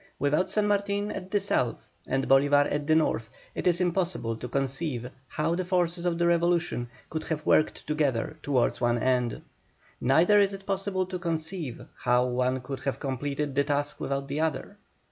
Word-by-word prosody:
Without 150 +6 +1
San 210 -1 +2
Martin 205 0 0
at 185 - -6
the 205 +1 +2
South 130 -11 -1 0.2
and 135 +1 0
Bolívar 145 +1 +5
at 145 0 -2
the 155 - +4
North 115 -8 +1 0.2
it - - -2
is 175 -1 +3
impossible 175 -10 0
to 125 - -6
conceive 135 -1 -2 0.2
how 155 +2 -1
the 185 +2 -1
forces 180 -1 0
of 170 -1 0
the 170 - +2
revolution 170 -7 +1 0.2
could 160 0 -3
have 155 -1 -3
worked 155 - +2
together 150 -3 0
towards 130 -5 +1
one 120 0 +2
end; 125 0 0 0.6
neither 170 +11 +5
is 200 -1 +3
it 195 0 -12
possible 195 -1 -1
to 185 0 -5
conceive 165 -4 -3
how 125 0 +3
one 125 +1 0
could 135 +2 -6
have 135 - -3
completed 140 +1 -3
his 140 0 +2
task 145 0 -1
without 140 0 -2
the 140 +2 -3
other. 160 -2 -2
150 Hz, 180 wpm, -28 LUFS, 135-175 Hz, 0.6 s, Bolívar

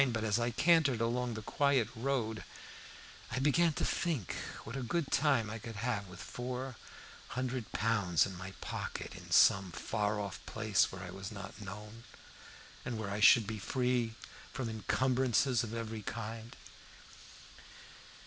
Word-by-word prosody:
But 110 -1 -1
as 110 +1 +2
I 120 0 +1
cantered 145 -1 +4
along 120 +1 0
the 110 - -6
quiet 140 -1 +2
road 115 -3 -1 0.9
I - - -3
began 155 +5 +4
to - - -1
think 155 - -1 0.3
what 110 - -7
a 135 - -2
good 145 +5 -1
time 120 -7 +3
I 110 +2 -5
could 115 -1 -7
have 105 -2 -1
with 90 0 -11
four 125 +5 -5 0.6
hundred 130 -3 -2
pounds 100 -6 +2
in 95 - -6
my 95 +2 -7
pocket, - - -4
in - - -11
some 95 -2 +6
far 105 +3 -1
off 100 -3 -5
place 110 -4 +2
where 95 0 -7
I 90 - -7
was 95 +2 -6
not 100 0 -8
known, 105 +3 -8 0.8
and 120 -2 -3
where 105 -2 -3
I 100 - -2
should 110 +1 +8
be 110 +1 -4
free 125 -1 0 0.4
from 125 -4 -3
incumbrances 125 +2 +2
of 115 - -5
every 110 -1 -4
kind. 115 +1 -6
115 Hz, 155 wpm, -34 LUFS, 105-125 Hz, 0.9 s, should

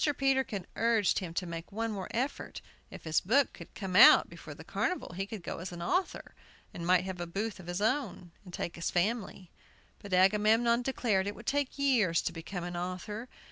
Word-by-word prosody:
Peterkin 265 -8 0
urged 225 -3 +2
him 180 -3 -6
to 180 - -1
make 165 -1 -7
one 225 +2 -2
more 195 -3 -5
effort. 255 +5 -3 0.3
If - - -11
his 160 -1 +1
book 260 +8 +2
could - - -13
come 190 -3 -5
out - - +8
before - - -10
the - - -11
carnival 365 - -2
he 195 +3 -4
could 205 -4 -7
go - - -5
as 180 +2 -6
an 170 -1 -6
author, 365 - -1 0.4
and 170 0 -5
might 185 0 +4
have 185 -2 -5
a 175 - -4
booth 200 +4 -4
of 175 - -11
his 175 +2 -3
own, 220 -8 -1
and 180 - -12
take 170 - -5
his 170 - -2
family. 195 -1 -2 0.5
But 200 - -11
Agamemnon 215 +5 +4
declared 230 -7 0
it 205 - -4
would - - -12
take 285 -1 -1
years 240 -12 +2
to - - -2
become 170 +2 -6
an 175 0 -5
author. 185 +7 -5
195 Hz, 205 wpm, -31 LUFS, 175-235 Hz, 0.5 s, out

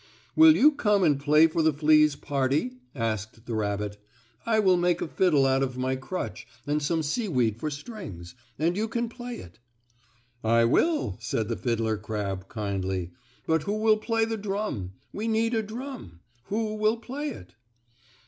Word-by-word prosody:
"Will 320 0 +8
you 300 +3 +6
come 210 -9 +2
and 145 -5 +3
play 150 +2 +5
for 165 0 +1
the 160 0 +4
fleas' 150 0 +4
party?" 140 - -1 0.2
asked 110 -1 -3
the 120 - -4
rabbit. 105 -1 -2 0.5
"I 225 -1 +3
will 190 -4 +4
make 175 -1 +2
a - - -2
fiddle 155 -5 +3
out 135 0 +2
of 130 -2 -2
my 130 +1 0
crutch 130 +8 -5 0.2
and 150 +1 0
some 160 +2 0
seaweed 140 - 0
for 155 - -2
strings, 145 - -8 0.2
and 165 +4 +1
you 215 +3 0
can 235 +1 -2
play 245 0 -7
it." 85 +3 -12 0.8
"I 115 +1 +4
will," 120 - +1
said 115 -1 -2
the 115 - 0
fiddler 115 -3 -1
crab, 100 -3 -4
kindly, 95 -4 -3 0.3
"but 160 -1 +2
who 200 +6 -2
will 215 0 +4
play 225 +1 0
the 225 0 -3
drum? 200 - -3 0.2
We 215 +3 -3
need 225 +1 +1
a 225 - +2
drum. 220 - -8 0.2
Who 215 +4 -2
will 215 +2 +2
play 265 +6 -5
it?" 90 - -10
150 Hz, 170 wpm, -27 LUFS, -, 0.8 s, Will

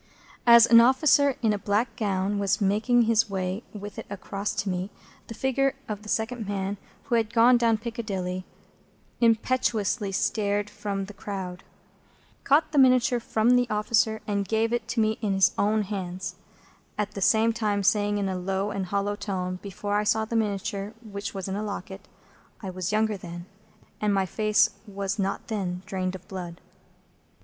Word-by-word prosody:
As 235 -1 +9
an 230 -1 +8
officer 275 +2 +4
in 220 -2 +3
a 205 - -2
black 215 +3 0
gown 200 -2 -1
was 200 -2 +1
making 215 +4 +3
his 225 -1 +2
way 190 +1 -2
with 205 0 -8
it - - -8
across 200 +1 -4
to 200 0 -2
me, 185 +1 -2 0.4
the 230 - -8
figure 270 +2 +1
of 210 -1 -5
the 210 - -10
second 220 0 -2
man 200 0 -2 0.3
who 270 - -5
had 225 -2 +2
gone 235 +2 +6
down 230 -2 +3
Piccadilly 205 -6 -4 0.8
impetuously 225 -3 +1
started 205 +1 0
from 200 -2 -4
the 210 - -11
crowd, 190 -2 -6 0.8
caught 295 +3 +3
the 295 - +3
miniature 255 -2 +4
from 225 0 +1
the 245 -1 +3
officer, 220 +1 +1
and 200 -2 -1
gave 225 +1 +1
it 235 -2 -1
to 235 - -2
me 220 0 +1
with 205 -3 0
his 195 - +4
own 210 +1 +1
hands, 190 -2 -5 0.6
at 210 -1 -1
the 200 - -7
same 225 +3 +4
time 210 -3 -1
saying, 205 0 +2
in 200 -1 -1
a 190 - -2
low 190 +2 -2
and 195 -2 -3
hollow 200 +2 -1
tone,—before 195 +1 -4
I 210 - +2
saw 220 +1 +1
the 230 - -5
miniature, 205 -1 -2
which 200 -2 -6
was 195 -1 -4
in 190 - -3
a 205 - -2
locket,—"I 195 -1 -9
was 185 0 -3
younger 215 -1 +1
then, 175 -1 -8 0.6
and 210 -1 +2
my 195 -1 +2
face 215 +2 +2 0.2
was 200 0 -3
not 195 0 -2
then 185 -5 -3
drained 190 -2 -3
of 185 - -11
blood." 180 -4 -7
205 Hz, 175 wpm, -26 LUFS, 195-225 Hz, 0.8 s, As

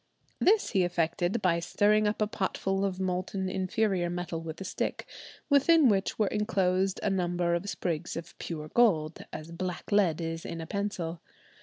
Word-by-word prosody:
This 420 +3 +3
he 190 - +3
effected 175 +3 0
by 170 -2 +3
stirring 210 +5 +2
up 210 +1 0
a - - 0
potful 195 -1 -1
of 190 -2 -1
molten 185 +1 -2
inferior 185 -1 0
metal 175 -1 -4
with 160 -1 -7
a - - -5
stick, - - -3 0.4
within 285 0 +5
which 195 -2 +1
were 215 - +3
enclosed 190 -2 +1
a - - +2
number 175 -2 0
of 175 +4 -1
sprigs 165 -6 -3
of 165 0 -8
pure 155 -2 -5
gold, 165 -10 +2
as 155 +2 -7
black 180 +3 -5
lead 185 -6 +3
is 165 0 -4
in 165 - -5
a 165 - -5
pencil. 175 -3 -3
185 Hz, 170 wpm, -29 LUFS, 170-205 Hz, 0.4 s, within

